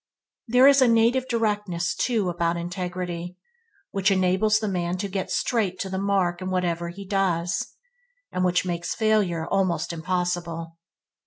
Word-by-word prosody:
There 250 +3 +6
is 280 -1 +6
a 255 - +6
native 235 +3 +3
directness, 210 -7 -1
too, 225 -6 0
about 170 0 0
integrity, 175 0 -4 0.5
which 195 +1 +2
enables 190 +3 +3
the 215 0 -2
man 180 -2 -1
to 200 +2 -3
get 190 -1 -3
straight 205 -7 0
to 190 - -4
the 190 - -2
mark 190 -3 0
in 185 - -3
whatever 175 -2 -1
he 195 +3 -9
does, 175 -4 -1 0.6
and 185 - -1
which 180 0 +2
makes 170 -1 -3
failure 210 -7 +1
almost 175 -3 0
impossible. 170 -1 -3
185 Hz, 150 wpm, -25 LUFS, 175-205 Hz, 0.6 s, There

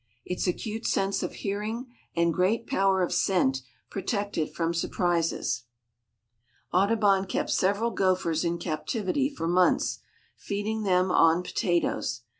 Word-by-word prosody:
Its 180 +1 -2
acute 220 +5 -2
sense 195 0 +1
of - - -3
hearing 210 +5 -2 0.3
and 170 0 +2
great 205 +7 +1
power 190 -1 +2
of 175 - -1
scent 135 -9 +2 0.3
protect 200 0 -2
it 155 - -1
from 165 0 -1
surprises. 170 -7 0 1.1
Audubon 195 0 +3
kept - - -1
several 205 +5 +1
gophers 180 -5 +1
in 170 0 0
captivity 195 - -1
for 265 - -4
months, 180 +1 +2 0.4
feeding 210 +2 -3
them 185 -2 +2
on 165 +1 +4
potatoes. 170 -10 -1
185 Hz, 125 wpm, -27 LUFS, 170-205 Hz, 1.1 s, on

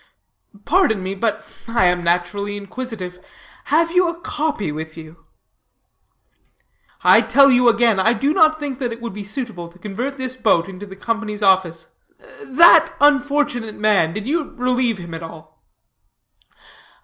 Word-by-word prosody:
"Pardon 260 - +2
me, 190 +1 -4
but 210 +2 -2 0.2
I 230 -4 +1
am 180 0 +1
naturally 200 +4 -1
inquisitive. 200 -4 -8 0.4
Have 330 +3 +1
you 360 0 +3
a 340 0 -7
copy 300 - -3
with 160 +1 -8
you?" 160 0 -13 1.8
"I - - +6
tell 275 0 +5
you 250 -1 +4
again, 230 -3 +2
I 220 +5 +3
do 275 +6 0
not 315 -3 +3
think 280 -4 -5
that 245 -3 -3
it 230 - -7
would 235 -3 -7
be 205 +1 -7
suitable 205 -5 -6
to 175 - -20
convert 225 +9 -5
this 255 -1 -4
boat 195 -9 +1
into 195 +1 -10
the 190 - -11
Company's 215 0 -4
office. 180 -4 +1 0.5
That 335 +4 +5
unfortunate 285 -6 +1
man, 210 -7 +2
did 210 +4 -6
you 305 +3 -3
relieve 250 -2 0
him 170 -2 -9
at 165 - -7
all?" 165 -1 -13
220 Hz, 150 wpm, -19 LUFS, 185-265 Hz, 1.8 s, I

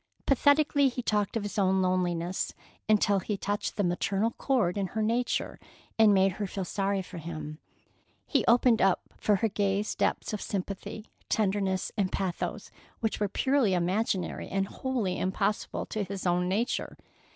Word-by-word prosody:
Pathetically 285 +1 +4
he 250 0 -5
talked 210 -1 0
of 220 - -3
his 205 0 -3
own 190 -1 +3
loneliness, 180 -1 -1 0.3
until 205 -2 +4
he 205 +2 -3
touched 205 +1 -2
the 205 - +2
maternal 195 +5 0
chord 230 -9 0
in 200 -2 -1
her 220 - -3
nature 235 +3 -1 0.4
and 220 -2 +7
made 195 -1 +4
her 200 +2 -4
feel 190 0 -4
sorry 195 +1 -1
for 180 -1 -9
him. 155 -1 -6 0.7
He - - +1
opened 235 0 +5
up 190 -1 +3
for 210 - +2
her 210 +4 +1
gaze 205 0 0
depths - - -1
of 210 - -3
sympathy, 200 +2 -4 0.2
tenderness, 195 -3 0
and 195 -3 +1
pathos, 190 -3 -3 0.3
which 225 -1 -1
were 205 -1 0
purely 260 -3 +2
imaginary 185 +1 -1
and 195 0 0
wholly 240 -8 -2
impossible 190 +3 -1
to 215 - -3
his 195 0 -6
own 180 0 +2
nature. 220 +6 -1
200 Hz, 160 wpm, -29 LUFS, 185-220 Hz, 0.7 s, and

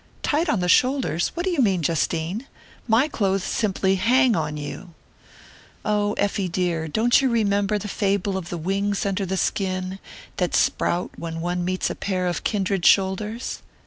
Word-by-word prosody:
"Tight 315 +4 +1
on 205 - +1
the 180 - 0
shoulders? 250 - +2
What 345 - -2
do 375 - 0
you 340 - -1
mean, 190 -7 +2
Justine? 165 - -1 0.4
My 230 +5 +4
clothes 195 - 0
simply 195 -2 0
hang 250 +4 +4
on 155 -2 -2
you!" 160 +4 -7 0.9
"Oh, 210 -1 +1
Effie 200 -3 -1
dear, 170 -2 -1
don't 230 - +3
you 265 - +2
remember 205 -3 +1
the 210 - -5
fable 200 -1 0
of 180 -3 -4
the 175 - -4
wings 195 +4 -1
under 195 -1 -1
the 190 +1 -1
skin, 185 0 -1 0.4
that 180 -2 0
sprout 175 +1 +1
when 165 -1 -5
one 175 +1 -2
meets 185 +1 -1
a - - -2
pair 185 -2 -2
of 175 -1 -2
kindred 195 -3 0
shoulders?" 205 +6 +2
195 Hz, 170 wpm, -23 LUFS, 180-210 Hz, 0.9 s, My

